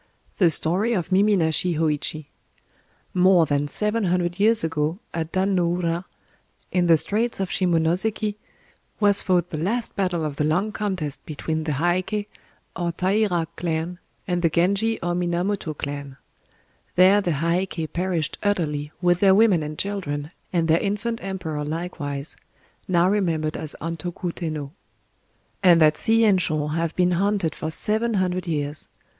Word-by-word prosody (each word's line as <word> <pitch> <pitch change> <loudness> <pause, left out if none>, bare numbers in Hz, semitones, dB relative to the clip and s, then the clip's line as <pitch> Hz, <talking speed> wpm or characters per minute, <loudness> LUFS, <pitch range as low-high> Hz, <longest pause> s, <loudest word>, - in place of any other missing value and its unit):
KWAIDAN 190 - +5
THE - - +5
STORY 180 +9 +1
OF 185 -3 -2
MIMI 200 +2 +4
NASHI 165 +1 +2
HŌÏCHI 155 -1 -1 0.9
More 180 -2 +5
than 145 -1 0
seven 210 +6 0
hundred 175 0 0
years 220 0 +4
ago, 160 +1 -1 0.2
at 165 -1 -3
Dan 190 +1 +1
no 175 -2 +2
ura, 175 0 -1 0.7
in 180 -1 +2
the 165 -1 +6
Straits 220 +8 0
of 190 -2 -1
Shimonoséki, 185 +5 +1 0.7
was 205 -1 +4
fought 180 -2 +1
the 155 - -3
last 225 +8 -1
battle 180 -5 0
of 145 -2 -4
the - - +1
long 175 +8 +1
contest 185 -9 -3
between 155 +1 -3
the 155 - -1
Heiké, 180 +7 0 0.5
or 175 -1 -1
Taira 185 -1 +1
clan, 170 +1 -3 0.3
and 175 -2 0
the 165 - +3
Genji, 200 +7 +1
or 175 0 0
Minamoto 175 -1 -1
clan. 140 -1 -5 0.8
There 190 +3 +6
the 175 -4 0
Heiké 170 0 -1
perished 170 -3 -1
utterly, 150 -7 -1
with 175 0 +3
their 195 -1 +5
women 205 -5 +4
and 150 0 -5
children, 155 -7 -3 0.2
and 170 -2 +1
their 160 +1 +4
infant 220 +3 -2
emperor 175 -6 -4
likewise—now 165 +2 -3
remembered 165 -6 0
as 155 - -4
Antoku 170 +2 -4
Tennō. 155 -5 -4 0.9
And 175 -3 +6
that 155 -1 +5
sea 225 +5 +2
and 195 -4 +4
shore 150 -2 0
have 165 +1 -1
been 180 -1 +2
haunted 190 -2 +1
for 155 - -4
seven 220 +7 +2
hundred 185 -1 -1
years... 150 -2 -3
175 Hz, 150 wpm, -23 LUFS, 160-195 Hz, 0.9 s, the